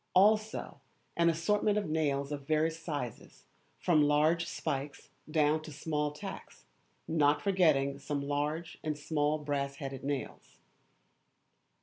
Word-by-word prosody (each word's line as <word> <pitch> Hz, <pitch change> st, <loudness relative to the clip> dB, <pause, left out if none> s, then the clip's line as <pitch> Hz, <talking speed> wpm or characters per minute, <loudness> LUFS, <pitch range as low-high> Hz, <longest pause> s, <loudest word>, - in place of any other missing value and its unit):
Also 215 Hz, +3 st, +3 dB, 0.3 s
an 170 Hz, 0 st, +4 dB
assortment 205 Hz, +5 st, +2 dB
of 205 Hz, -4 st, -1 dB
nails 145 Hz, -3 st, 0 dB
of 140 Hz, -2 st, -5 dB
various 160 Hz, +1 st, +1 dB
sizes, 145 Hz, -8 st, -6 dB, 0.3 s
from 160 Hz, -4 st, +3 dB
large 155 Hz, +3 st, +3 dB
spikes 145 Hz, -3 st, -4 dB, 0.2 s
down 155 Hz, 0 st, +2 dB
to 155 Hz, -, -9 dB
small 150 Hz, 0 st, -1 dB
tacks, 150 Hz, 0 st, -9 dB, 0.4 s
not 145 Hz, -2 st, +3 dB
forgetting 145 Hz, -7 st, +2 dB
some 145 Hz, 0 st, -2 dB
large 150 Hz, +3 st, -2 dB
and 155 Hz, -2 st, -2 dB
small 150 Hz, 0 st, 0 dB
brass 140 Hz, -2 st, -2 dB
headed 135 Hz, -2 st, -6 dB
nails. 140 Hz, -1 st, -5 dB
150 Hz, 120 wpm, -32 LUFS, 145-165 Hz, 0.4 s, an